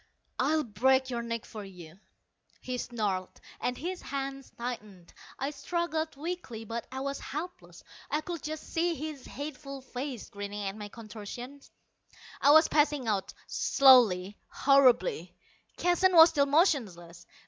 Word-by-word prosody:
"I'll 305 +4 +2
break 260 +3 +2
your 235 -1 -2
neck 230 -1 -4
for 215 -2 -8
you," 180 -3 -12 0.6
he 255 -1 -4
snarled, 205 -7 -3 0.2
and 250 0 -2
his 360 +4 -4
hands 275 -1 -5
tightened. 210 -7 -7 0.2
I 270 +2 -2
struggled 320 +2 -2
weakly, 290 -8 -5
but 230 +2 -5
I 265 0 -4
was 275 0 -3
helpless. 330 +6 -7 0.3
I 300 - 0
could 335 0 -5
just 310 0 -5
see 335 +1 -1
his 300 -2 -6
hateful 280 -1 -7
face 260 -2 -6
grinning 205 0 -5
at 195 - -4
my 210 -1 -7
contortions. 230 +5 -9 0.7
I - - +5
was 315 +2 +8
passing 295 -4 +2
out 200 -3 -1
slowly, 210 -8 +5
horribly. 275 - +3 0.4
Keston 355 +1 +3
was 325 0 +10
still 285 -3 +2
motionless. 210 - +1
265 Hz, 135 wpm, -30 LUFS, 220-300 Hz, 0.7 s, was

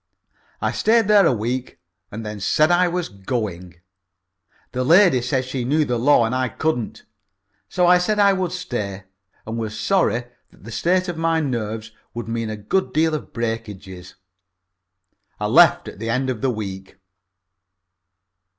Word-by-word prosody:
I - - 0
stayed 225 -1 +2
there 205 -4 +6
a - - +4
week 125 +2 -3 0.3
and 110 +2 -7
then 105 -1 -6
said 155 - +2
I 180 +1 +4
was 175 0 -2
going. 95 -4 -5 1.0
The 130 0 -2
lady 170 -2 +5
said 130 +1 -1
she 130 -1 -3
knew 150 +5 +1
the 120 -3 -1
law 125 -1 +4
and 115 - -2
I 130 -1 0
couldn't. 125 -4 -3 0.7
So 180 - +1
I 180 0 +6
said 210 +4 0
I 200 -1 +5
would 185 -2 -2
stay, 105 - -4 0.4
and 115 +1 -4
was 110 -1 -4
sorry 145 - +1 0.3
that - - -22
the 115 - -9
state 180 - +1
of 175 -2 -4
my 165 0 +1
nerves 110 -6 -3 0.2
would 120 -1 -5
mean 115 -1 -3
a 110 - -5
good 125 - -1
deal 160 +1 +2
in 155 - -3
breakages. 100 -6 -6 1.2
I - - -2
left - - +5
at - - -9
the 115 +1 -4
end 130 +3 0
of 115 -4 -6
the 135 - +1
week. 95 -4 -6
125 Hz, 165 wpm, -21 LUFS, 110-165 Hz, 1.2 s, there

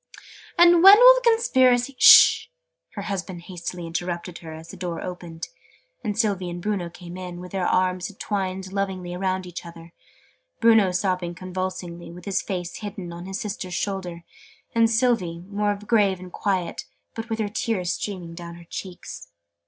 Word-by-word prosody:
"And 345 0 +7
when 390 +3 +10
will - - +9
the - - -1
Conspiracy 260 - +3
" - - -30
"Hist!', - - +8 0.5
her - - -5
husband 185 -3 -5
hastily 175 -1 -6
interrupted 170 +1 -4
her, 160 -2 -10
as 160 +1 -10
the - - -9
door 175 -2 -4
opened, 175 -2 -7 0.6
and 210 -3 -3
Sylvie 200 -5 0
and 175 0 -6
Bruno 190 -2 -2
came 175 +1 -10
in, 180 -1 -7
with 180 0 -9
their 190 -2 -1
arms 185 +1 0
twined 190 -2 -3
lovingly 190 -3 -3
round 185 0 -2
each 180 -1 -8
other 170 0 -12 0.7
Bruno 225 -5 +5
sobbing 180 -1 -1
convulsively, 185 -1 -5
with 175 +1 -11
his 200 -2 0
face 180 -3 -5
hidden 195 -4 -7
on 175 +2 -8
his 190 0 -4
sister's 190 -4 -5
shoulder, 180 -4 -4 0.5
and 230 -1 +4
Sylvie 220 -8 +1
more 205 +2 -1
grave 205 -2 +1
and 180 0 -10
quiet, 190 -4 -2 0.3
but 225 +1 -7
with 225 - -2 0.2
tears 185 -8 -1
streaming 180 -5 -5
down 170 0 -9
her 170 0 -14
cheeks. 180 - -8
185 Hz, 165 wpm, -24 LUFS, 175-205 Hz, 0.7 s, when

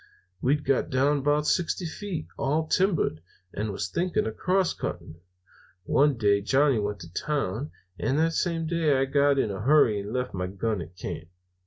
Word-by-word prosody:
We'd 145 +3 +1
got 135 - +1
down 140 +3 +2
about 145 +2 +1
sixty 175 +2 0
feet, 170 -1 -5
all 150 +4 0
timbered, 165 - +1 0.3
and 105 +1 -2
was 95 -1 -3
thinking 175 - 0
of 110 0 -4
crosscutting. 180 - -1 0.7
One 140 +5 +3
day 100 -2 +3
Johnny 135 +3 +3
went 105 -2 -3
to 85 0 -11
town, 140 - -2 0.3
and 135 - 0
that 165 +1 +2
same 165 -1 0
day 160 -4 +2
I 135 - +2
got 140 +1 +3
in 110 -6 +1
a 95 - -5
hurry 125 -4 +4
and 100 +1 -6
left 125 +1 -2
my 90 -1 -2
gun 100 +1 -2
at 85 +2 -10
camp. - - -6
135 Hz, 175 wpm, -27 LUFS, 105-155 Hz, 0.7 s, hurry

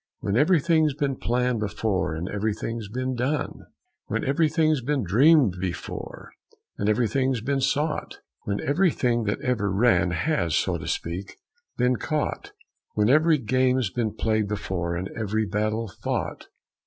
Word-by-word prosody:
When 100 - -1
everything's 155 0 +3
been 140 -2 -1
planned 125 0 0
before 105 -5 -1
and 85 +3 -4
everything's 105 +1 -3
been 130 +3 -2
done? 130 +5 -2 0.4
"When - - -2
everything's 155 0 +2
been 135 +1 0
dreamed 120 - +4
before 95 -2 -6 0.5
and 100 - +1
everything's 125 +3 +1
been 135 +3 -1
sought? 145 +3 -1 0.2
When 100 0 -2
everything 135 - +1
that 105 - -1
ever 110 -6 0
ran 95 -4 +3
has, 85 - 0
so 85 -2 0
to 75 - -7
speak, 90 +4 -4 0.4
been 125 0 +2
caught? 150 +3 -2 0.4
When 105 +1 +3
every 155 +3 +5
game's 130 -2 +1
been 115 -2 -2
played 110 -2 0
before 95 -4 -3
and 90 +2 -3
every 110 0 -1
battle 110 +2 -1
fought?" - - -3
115 Hz, 140 wpm, -25 LUFS, 100-140 Hz, 0.5 s, every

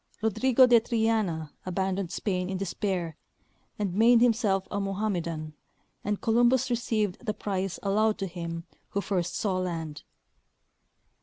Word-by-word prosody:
Rodrigo 255 +4 +5
de 240 -2 +6
Triana 220 -9 0
aban 190 +1 -1
doned 195 -3 -3
Spain 180 0 -2
in 190 - -2
despair 185 -3 -2 0.6
and 200 -4 -1
made 230 +4 +6
himself 220 -5 +2
a 200 - -1
Mohammedan, 175 -6 -2 0.5
and 210 -1 -1
Columbus 240 +2 +3
received 220 -5 -1
the 215 -3 -2
prize 190 -3 -3
allowed 210 +2 +2
to 195 - -2
him 170 -2 -5 0.3
who 200 - -1
first 180 -3 -1
saw 190 -3 0
land. 165 -4 -4
195 Hz, 135 wpm, -28 LUFS, 180-220 Hz, 0.6 s, de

